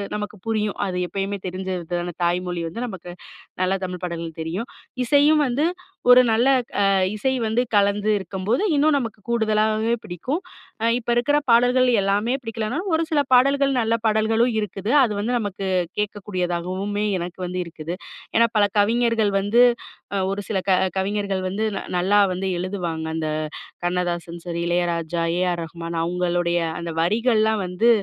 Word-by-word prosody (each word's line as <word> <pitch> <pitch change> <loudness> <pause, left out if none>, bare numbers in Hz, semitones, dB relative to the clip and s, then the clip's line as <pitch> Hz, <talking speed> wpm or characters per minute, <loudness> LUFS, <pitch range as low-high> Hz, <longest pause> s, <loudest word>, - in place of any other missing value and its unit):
நமக்கு 210 0 -5
புரியும். 215 -2 -1
அது 180 -1 -3
எப்பயுமே 195 +2 -2
தெரிஞ்சthuதான? 175 -2 -4
தாய்மொழி 175 0 -1
வந்து 230 +9 -5
நமக்கு 180 -4 -8 0.5
நல்ல 185 +1 +2
தமிழ் 180 0 -6
பாடல்கள் 165 -2 -5
தெரியும். 185 +9 -4 0.4
இசையும் 295 +3 +4
வந்து 285 +7 +1 0.4
ஒரு 250 - +9
நல்ல 235 +4 +3 0.3
அ - - +4 0.3
இசை 260 +5 0 0.2
வந்து 225 +3 +1
கலந்து 205 +1 +2
இருக்கும்போது 195 - -2
இன்னும் 295 +1 +4
நமக்கு 230 -5 -4
கூடுதலாவே 220 0 +1
பிடிக்கும். 255 - -3 0.4
அ - - +3
இப்ப 240 - -8
இருக்குற 270 +5 +2
பாடல்கள் 245 +2 +4
எல்லாமே 205 +5 +1
பிடிக்கலன்னாலும், 235 - -3
ஒரு 330 - +1
சில 295 - +3
பாடல்கள் 275 +2 +4
நல்ல 225 0 +1
பாடல்களும் 220 +2 +2
இருக்குது. 205 +2 -3
அது 225 - +1
வந்து 235 +4 -1
நமக்கு 200 -2 -4 0.3
கேட்கக்கூடியதாகவுமே 195 0 -2
எனக்கு 175 +2 -6
வந்து 180 +1 -3
இருக்குது. 165 0 -6 0.4
ஏனா 230 - +6
பல 205 - +5
கவிஞர்கள் 225 -1 +2
வந்து 205 +4 +2 0.6
அ - - +1
ஒரு 200 +1 -3
சில 210 - -1
க - - +5 0.3
கவிஞர்கள் 200 0 -1
வந்து 200 +4 -2
ந - - -2 0.2
நல்லா 195 +4 +3
வந்து 190 +1 -3
எழுதுவாங்க 175 -4 -3
அந்த 160 -1 -2 0.6
கண்ணதாசன் 175 -1 -2
சரி, 170 -1 -3
இளையராஜா, 170 -1 0 0.2
ஏஆர் 180 -1 0
ரகுமான் 170 +1 -7
அவங்களுடைய 175 0 0 0.2
அந்த 170 -1 -4
வரிகள்லாம் 220 +2 +2
வந்து 180 +7 +2
200 Hz, 145 wpm, -23 LUFS, 180-230 Hz, 0.6 s, ஒரு